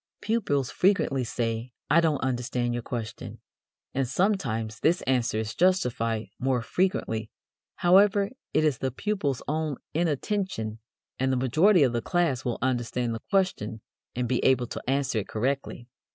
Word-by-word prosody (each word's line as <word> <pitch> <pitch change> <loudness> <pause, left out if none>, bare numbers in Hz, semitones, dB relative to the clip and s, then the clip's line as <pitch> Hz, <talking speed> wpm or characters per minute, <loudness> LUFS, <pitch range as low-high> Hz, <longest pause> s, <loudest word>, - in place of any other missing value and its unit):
Pupils 145 - 0
frequently 180 -9 +2
say: 115 0 -3
"I 165 +4 +5
don't 155 -4 +1
understand 120 -1 -1
your 120 - -2
question," 115 -2 -6 0.5
and 135 -1 0
sometimes 115 - 0
this 170 +3 +2
answer 125 -4 +1
is 110 0 -2
justified, 120 -11 +1
more 130 -2 +1
frequently, 115 - -1 0.5
however, 200 +3 +4 0.2
it - - +2
is 150 -6 +1
the 130 - 0
pupil's 145 - -2
own 155 -2 -1 0.2
inattention, 160 - -1 0.4
and 130 0 +1
the 130 - +1
majority 155 - +4
of 125 -3 +2
the 120 - 0
class 170 -7 0
will 120 -3 -2
understand 120 -1 0
the 115 - -5
question 120 - 0 0.3
and 125 0 -1
be 125 0 0
able 130 -2 +4
to - - -6
answer 135 -3 +1
it 100 - -5
correctly. 125 +1 -2
130 Hz, 150 wpm, -27 LUFS, 120-170 Hz, 0.5 s, I